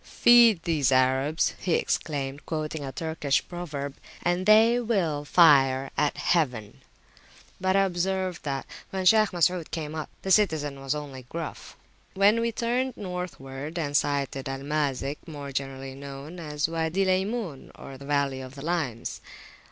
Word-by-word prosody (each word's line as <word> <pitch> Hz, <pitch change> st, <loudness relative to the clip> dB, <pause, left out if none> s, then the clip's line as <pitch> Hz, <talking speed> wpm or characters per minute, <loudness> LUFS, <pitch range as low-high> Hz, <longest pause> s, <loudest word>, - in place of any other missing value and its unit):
Feed 235 Hz, -7 st, +5 dB
these 150 Hz, -5 st, +1 dB
Arabs, 130 Hz, +4 st, +2 dB
he 175 Hz, -, +1 dB
exclaimed, 140 Hz, -2 st, -2 dB
quoting 155 Hz, -1 st, -3 dB
a 135 Hz, -, -5 dB
Turkish 160 Hz, -2 st, -1 dB
proverb, 145 Hz, -6 st, -5 dB, 0.3 s
and 175 Hz, +1 st, +1 dB
[p.147] -, -, -8 dB
they 225 Hz, +3 st, +6 dB
will 185 Hz, -11 st, 0 dB
fire 135 Hz, -5 st, +5 dB
at 150 Hz, -, +1 dB
Heaven! 125 Hz, -11 st, 0 dB, 0.8 s
But 190 Hz, 0 st, +2 dB
I 195 Hz, -, +5 dB
observed 185 Hz, 0 st, -1 dB
that, 135 Hz, -2 st, -3 dB, 0.2 s
when 190 Hz, -1 st, -3 dB
Shaykh 215 Hz, +2 st, +6 dB
Masud 175 Hz, -1 st, +1 dB
came 155 Hz, -2 st, -4 dB
up, 155 Hz, -1 st, -5 dB
the 190 Hz, -, -2 dB
citizen 155 Hz, -9 st, +2 dB
was 135 Hz, +2 st, -1 dB
only 135 Hz, -4 st, -7 dB
gruff. 165 Hz, -2 st, -7 dB, 0.4 s
We 195 Hz, -, -7 dB
then 230 Hz, +1 st, 0 dB
turned 245 Hz, +3 st, -1 dB
Northward, 160 Hz, -5 st, -6 dB
and 145 Hz, -3 st, -2 dB
sighted 140 Hz, -2 st, 0 dB
Al 135 Hz, 0 st, -5 dB
Mazik, 145 Hz, -1 st, -1 dB
more 145 Hz, -3 st, -7 dB
generally 135 Hz, 0 st, -4 dB
known 140 Hz, +5 st, -9 dB
as 150 Hz, -2 st, -2 dB
Wady 165 Hz, +3 st, 0 dB
Laymun, 190 Hz, -, -1 dB, 0.3 s
the -, -, -10 dB
Valley 140 Hz, -2 st, 0 dB
of 130 Hz, +1 st, -10 dB
Limes. 140 Hz, -6 st, -3 dB
155 Hz, 145 wpm, -26 LUFS, 140-180 Hz, 0.8 s, they